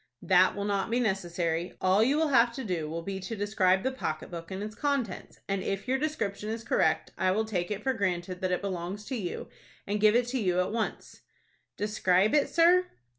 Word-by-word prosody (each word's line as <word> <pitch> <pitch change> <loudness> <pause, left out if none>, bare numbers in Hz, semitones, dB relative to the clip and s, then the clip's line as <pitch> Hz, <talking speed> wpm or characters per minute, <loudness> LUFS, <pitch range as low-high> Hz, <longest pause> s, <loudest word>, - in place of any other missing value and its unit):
"That 185 0 +4
will 200 0 -3
not 200 +1 0
be 235 +2 +1
necessary. 175 -5 -1
All 190 +2 +3
you 275 +5 +2
will 320 -1 +2
have 240 -3 +5
to 265 - -4
do 170 -7 -2
will 165 +1 -4
be 195 +1 -4
to 195 +4 -5
describe 195 -2 +2
the 260 - 0
pocket 155 -13 -4
book 170 -1 -7
and 190 +1 -4
its 215 0 -6
contents, 270 -6 -3
and, 195 -1 -1
if 195 +4 -3
your 265 +1 +1
description 215 -9 -2
is 225 +1 -4
correct, - - +1
I 185 - +2
will 215 +4 +1
take 180 -5 -2
it 210 0 -4
for 265 - +1
granted 185 -4 -2
that 185 -1 0
it 180 - 0
belongs 190 +2 -4
to 260 - -4
you, 190 -7 -4 0.4
and 205 +1 -2
give 215 +1 +5
it 245 0 +3
to 260 +1 -1
you 180 -4 +1
at 180 - 0
once." 225 0 -4 0.6
"Describe 205 -1 +2
it, 295 -2 +3
sir?" 355 +2 +4
200 Hz, 220 wpm, -29 LUFS, 185-230 Hz, 0.6 s, have